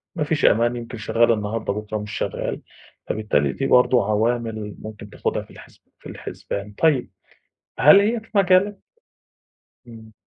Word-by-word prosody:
ما 155 - -1
فيش 155 +1 0
أمان، 120 +2 +3
يمكن 120 0 -7
شغّال 115 +2 +2
النهاردة، 105 -1 -2
بُكرا 105 +1 -4
مش 105 +1 -7
شغّال. - - -3 0.5
فبالتالي 75 -11 0
دي 135 - -2
برضه 125 -1 +4
عوامل 110 -1 -1
ممكن 110 -1 -10
تاخدها - - -2
في - - -19
الحِسب - - -16 0.2
في - - -11
الحِسبان. 100 +1 -6
طيب 145 +1 +1 0.7
هل 150 +8 +8
هي 225 +3 +1
في 220 - -20
مجالك؟ 195 +1 +3 1.1
إمم. 110 -2 -13
115 Hz, 145 wpm, -22 LUFS, 105-145 Hz, 1.1 s, هل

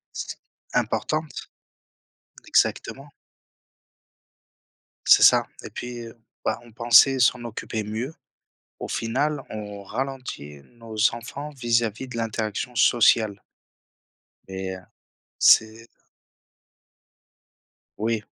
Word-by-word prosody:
C - - -5 0.4
importante, 155 -1 -2 1.0
exactement. 140 +1 0 2.0
C'est - - +8
ça. - - +7 0.2
Et - - -7
puis, 120 0 -7
heu, 115 - -14 0.3
bah, - - -1
on 120 - -16
pensait 120 +4 +5
s'en 125 0 +3
occuper 110 -1 -5
mieux. 115 +9 -5 0.7
Au - - -5
final, 135 +5 -1
on 105 -2 -7
ralentit 125 - -5 0.2
nos 115 -2 -11 0.2
enfants 140 +5 -7
vis-à-vis 120 0 0
de 120 - -8
l'interaction 115 +1 -3
sociale 110 -3 +3 1.1
mais, 95 0 -5
heu, 95 - -13 0.5
c'est 110 +1 +4 2.1
Oui, 110 0 -1
115 Hz, 90 wpm, -24 LUFS, 110-125 Hz, 2.1 s, C'est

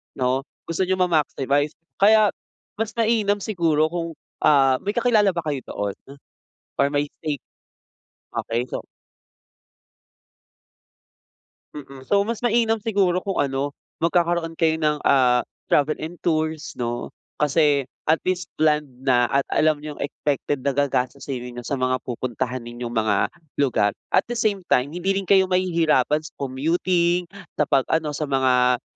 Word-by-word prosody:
'no, 130 0 +1 0.2
gusto 170 +3 -1
n'yong 185 0 +2
ma-maximize, 145 -3 +1 0.2
kaya 215 +1 +6 0.5
mas 220 0 -2
mainam 215 -3 +1
siguro 160 -6 +1
kung, 170 -2 -4 0.2
ah, 135 -3 +4
may 205 +1 -3
kakilala 220 -6 +3
ba 170 - -2
kayo 145 -3 -2
doon? 100 -1 -3 0.9
Or 140 - +4
may 145 0 0 0.2
safe 150 -4 -3 0.9
okey, 120 +2 -2
so - - -4 2.9
Mm, 135 -2 -10
so 200 +9 +2
mas 230 0 -3
mainam 230 -2 +2
siguro 195 -5 +1
kung 195 0 -3
ano, 140 0 0 0.3
magkakaroon 170 -1 +1
kayo 160 -1 +3
ng, 150 -1 +2
ah, 125 -3 +4 0.2
travel 145 +1 +3
and 165 +3 -6
tours 155 -1 -1
'no? 120 0 -4 0.2
Kasi 145 -2 +2 0.2
at 160 - +5
least 180 -1 -1
planned 150 -2 +2 0.2
na 120 -2 +3
at 140 0 +1
alam 155 -1 +3
niyong 150 0 -8
expected 140 -1 -2
na 140 - +2
gagastosin 135 -1 -1
ninyo 120 0 -7
sa 140 - -2
mga 130 0 0
pupuntahanin 125 0 -4
yung 120 - -4
mga 110 -3 +1 0.3
lugar. 105 -7 +2 0.2
At - - +3
the 240 - -4
same 205 -5 0
time 130 -4 +2
hindi 180 +3 -1
rin 195 0 -1
kayo 190 -1 +6
mahihirapan 165 -5 +2
sa - - -10
commuting, 170 +6 +1 0.2
sa - - +1
'pag 135 -2 +3
ano 160 -1 0
sa 155 - -1
mga, 125 -2 +2
150 Hz, 140 wpm, -23 LUFS, 130-180 Hz, 2.9 s, kaya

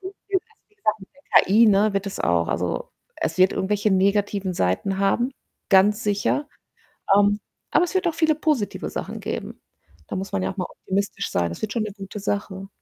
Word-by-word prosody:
also, 380 +1 -7 0.5
wie 420 - -33
gesagt, 215 - -1
mit 190 - -12
der 280 - +3
KI, 220 +5 +5
ne, 205 0 +4
wird 195 0 -1
des 195 - -5
auch 85 -1 +1
also, 90 0 -2 0.3
es - - -2
wird 185 +1 +5
irgendwelche 205 +2 0
negativen 200 0 +1
Seiten 170 - 0
haben, 240 +6 +1 0.4
ganz 210 +3 +5
sicher, 210 +8 0 0.7
ähm, 205 0 +3 0.3
aber 355 - +4
es 360 - -5
wird 375 -1 +1
auch 335 - +1
viele 315 -1 +3
positive 295 -9 -1
Sachen - - -5
geben. - - -5 0.5
Da - - -4
muss 190 +1 -5
man 95 - 0
ja 95 - -1
auch - - -20
mal 180 - -2
optimistisch 200 +1 -3
sein, 85 -1 0
das 85 - -8
wird 210 -2 -2
schon 230 - 0
'ne 215 -2 -4
gute 200 +1 -7
Sache. 195 -1 -3
200 Hz, 195 wpm, -23 LUFS, 190-220 Hz, 0.7 s, KI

